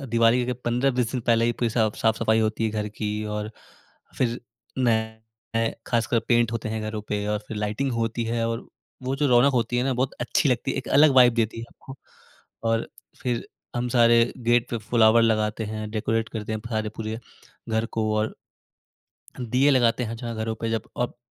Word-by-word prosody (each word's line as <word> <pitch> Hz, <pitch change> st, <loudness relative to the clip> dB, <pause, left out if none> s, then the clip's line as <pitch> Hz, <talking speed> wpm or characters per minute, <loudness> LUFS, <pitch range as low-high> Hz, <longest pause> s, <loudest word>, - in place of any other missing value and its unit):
अ, -, -, -6 dB
दिवाली 115 Hz, +1 st, +3 dB
के 125 Hz, -, 0 dB
15-20 125 Hz, 0 st, 0 dB
दिन 125 Hz, -, -1 dB
पहले 115 Hz, 0 st, +3 dB
ही 120 Hz, -, +2 dB
पूरी 120 Hz, -1 st, -1 dB
साफ 110 Hz, -2 st, +1 dB
साफ-सफाई 110 Hz, 0 st, +2 dB
होती 110 Hz, +1 st, 0 dB
है 110 Hz, -, +1 dB
घर 105 Hz, -1 st, -2 dB
की 105 Hz, 0 st, -4 dB, 0.3 s
और 105 Hz, 0 st, -4 dB, 0.7 s
फिर 120 Hz, -1 st, 0 dB, 0.4 s
नए 110 Hz, -1 st, -1 dB, 0.2 s
खासकर 120 Hz, 0 st, +1 dB
पेंट 120 Hz, -1 st, +3 dB
होते 115 Hz, -1 st, -3 dB
हैं 110 Hz, 0 st, -2 dB
घरों 110 Hz, 0 st, -4 dB
पे 105 Hz, 0 st, -2 dB
और 105 Hz, -, 0 dB
फिर 110 Hz, -, -5 dB
लाइटिंग 105 Hz, +6 st, -1 dB
होती 115 Hz, 0 st, -1 dB
है 115 Hz, 0 st, -1 dB
और 115 Hz, 0 st, -4 dB, 0.4 s
वो 130 Hz, +1 st, -1 dB
जो 145 Hz, +1 st, +1 dB
रौनक 125 Hz, +3 st, +5 dB
होती 120 Hz, 0 st, +1 dB
है -, -, +2 dB
ना 135 Hz, -, +1 dB
बहुत 130 Hz, +1 st, 0 dB
अच्छी 125 Hz, +5 st, +1 dB
लगती 125 Hz, +1 st, 0 dB
है, -, -, -5 dB
एक 130 Hz, -, -5 dB
अलग 145 Hz, +1 st, +6 dB
वाइब 125 Hz, -2 st, +7 dB
देती 115 Hz, -1 st, 0 dB
है -, -, -6 dB
आपको। 135 Hz, -, -12 dB, 0.7 s
और 115 Hz, 0 st, 0 dB, 0.3 s
फिर 120 Hz, -2 st, -2 dB, 0.3 s
हम 125 Hz, +1 st, -1 dB
सारे 115 Hz, -1 st, +4 dB
गेट 120 Hz, 0 st, +2 dB
पे 120 Hz, -, -1 dB
फ्लावर 110 Hz, +1 st, +4 dB
लगाते 110 Hz, -1 st, +1 dB
हैं, 110 Hz, 0 st, -5 dB
डेकोरेट 110 Hz, +1 st, -1 dB
करते 110 Hz, -1 st, -4 dB
हैं 110 Hz, -, -3 dB
सारे 110 Hz, -1 st, -1 dB
पूरे 110 Hz, 0 st, -4 dB, 0.5 s
घर 110 Hz, 0 st, 0 dB
को 110 Hz, -1 st, +1 dB
और 110 Hz, +1 st, -1 dB, 1.1 s
दीये 125 Hz, +4 st, +2 dB
लगाते 125 Hz, -2 st, +3 dB
हैं, 115 Hz, +1 st, -5 dB
जहाँ 115 Hz, -1 st, -5 dB
घरों 110 Hz, 0 st, -2 dB
पे 115 Hz, +1 st, -3 dB
जब 115 Hz, -, -3 dB
अब 125 Hz, -, -2 dB
115 Hz, 195 wpm, -25 LUFS, 110-120 Hz, 1.1 s, वाइब